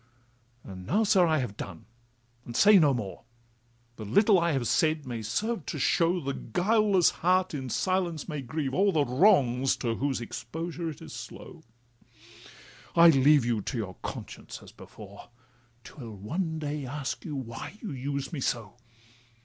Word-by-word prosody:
'And 95 -2 -10
now, 215 +4 +2
sir, 195 -4 +4
I 160 -1 +2
have 125 -7 -3
done, 95 -5 -8 0.6
and 120 - -9
say 205 -1 +7
no 150 -4 +5
more; 100 -8 -4 0.8
The 110 - -7
little 195 - +4
I 170 0 +1
have 130 -4 -1
said 155 +3 +1
may 120 -3 -5
serve 195 - -2
to - - -4
show 170 +6 +2
The 140 -3 -3
guileless 200 +1 +2
heart 185 +1 +2
in 130 -3 -4
silence 175 - -1
may 150 -4 -4
grieve 135 +1 -3
o'er 195 +4 +3
The 150 -5 +2
wrongs 130 - +3
to 115 -3 -2
whose 135 -2 -1
exposure 160 +9 -5
it 155 - -9
is - - -10
slow: - - -10 1.3
I 170 0 +8
leave 140 -1 +5
you 115 -3 0
to 125 - -4
your 100 -5 -4
conscience - - -7
as - - -13
before, 100 0 -13 0.5
'Twill 120 -5 -10
one 160 - -3
day 150 -1 -4
ask 135 +1 -4
you 150 - -5
why 125 - -7
you 215 - -6
used 140 +3 -4
me 155 - -3
so? 115 -4 -3
145 Hz, 165 wpm, -28 LUFS, 120-175 Hz, 1.3 s, I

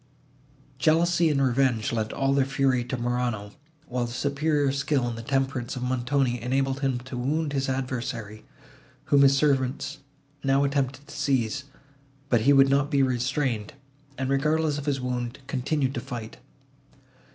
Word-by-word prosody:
Jealousy 170 +1 +3
and 145 -2 +1
revenge 130 -4 +2
lent 110 -2 -1
all 135 0 +1
their 140 -1 +3
fury 135 -2 +1
to 130 +1 -4
Morano, 120 -4 -2 0.4
while 125 -1 -1
the 120 - -6
superior 140 +2 +1
skill 140 -2 0
and 120 - -3
the 115 - -6
temperance 135 -2 -1
of 125 - -4
Montoni 125 0 0
enabled 135 +2 0
him 135 -3 0
to 125 +1 -8
wound 145 +4 -1
his 135 -1 -1
adversary, 120 -5 -4 0.6
whom 140 - +4
his 135 0 +6
servants 135 -1 0 0.4
now 135 0 +3
attempted 140 0 -1
to - - -10
seize, 135 -2 0 0.6
but 120 -3 +3
he 135 +6 +4
would 135 -1 +6
not 140 +1 +2
be 140 -3 +3
restrained, 125 -3 -1 0.4
and, 130 0 -2
regardless 150 +2 +1
of 145 - -8
his 140 -2 +1
wound, 125 -1 -3
continued 135 +1 -1
to 120 - -3
fight. 120 -3 -7
135 Hz, 155 wpm, -26 LUFS, 125-140 Hz, 0.6 s, his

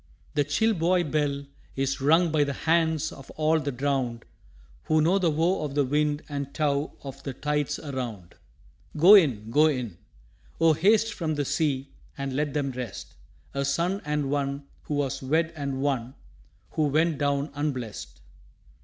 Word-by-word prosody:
The 145 - +2
chill 220 +11 +1
buoy 175 0 +2
bell 145 -2 -1 0.3
is 135 +1 -1
rung 160 +4 +4
by 150 -2 +3
the 140 -1 -2
hands 160 -1 +2
Of 135 - -12
all 155 +1 +3
the 145 -2 -2
drowned, 130 -3 -2 0.6
Who 155 - +3
know 175 +6 +3
the 175 -3 +2
woe 165 +3 +1
of 145 -2 -4
the 145 -1 +3
wind 150 +2 0
and 140 -2 -4
tow 145 -1 0
Of 135 0 -8
the 135 -2 -6
tides 150 0 -1
around. 120 - -6 0.6
Go 175 +7 +8
in, 125 - +5
go 150 +5 +5
in! 125 - -3 0.6
Oh, 165 -1 +5
haste 215 +8 +3
from 160 -3 -2
the 145 -1 -1
sea, 140 -2 -1 0.3
And 140 -1 -3
let 145 0 -1
them 140 -2 0
rest 125 -5 -7 0.4
A 140 0 -1
son 170 +8 0
and 150 -2 -1
one 140 0 -1 0.2
who 150 - -2
was 140 -1 -1
wed 160 +5 +1
and 140 -2 -3
one 130 -3 -1 0.6
Who 155 - +1
went 155 +1 +1
down 140 0 0
unblest. 130 - -4
145 Hz, 165 wpm, -26 LUFS, 135-155 Hz, 0.6 s, Go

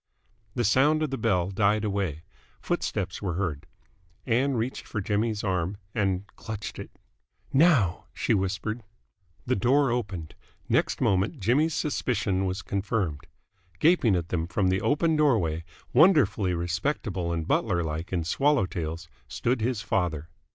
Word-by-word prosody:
The 120 - +1
sound 145 +8 +3
of 150 - -2
the 135 - -2
bell 95 -5 +1
died 105 +2 +2
away. 95 -7 -2 0.4
Footsteps - - -2
were 90 -4 -2
heard. 85 -7 -3 0.6
Ann 130 +3 +2
reached 120 +3 -3
for 110 - -3
Jimmy's 105 +2 -1
arm 95 -1 -1 0.2
and 95 -3 0
clutched 110 -1 -6
it. - - -7 0.6
"Now!" 135 - +4
she - - 0
whispered. 100 +3 -1 0.6
The 130 - +1
door 130 +6 +3
opened. 95 -10 -3 0.3
Next - - +1
moment 100 - +1
Jimmy's 145 - +2
suspicion 105 - 0
was 95 +1 -3
confirmed. 95 -6 -2 0.5
Gaping 150 - +4
at 85 -1 -2
them 85 -2 -1
from 95 +2 +1
the 95 +1 +1
open 160 +3 +2
doorway, 95 - +2 0.3
wonderfully 120 - +4
respectable 90 - -2
and 80 -1 -2
butlerlike 85 -4 0
in 90 -3 0
swallow 135 - +2
tails, 85 -2 -5 0.2
stood 120 - -1
his 115 -1 -1
father. 80 -7 -1
100 Hz, 135 wpm, -27 LUFS, 90-125 Hz, 0.6 s, Now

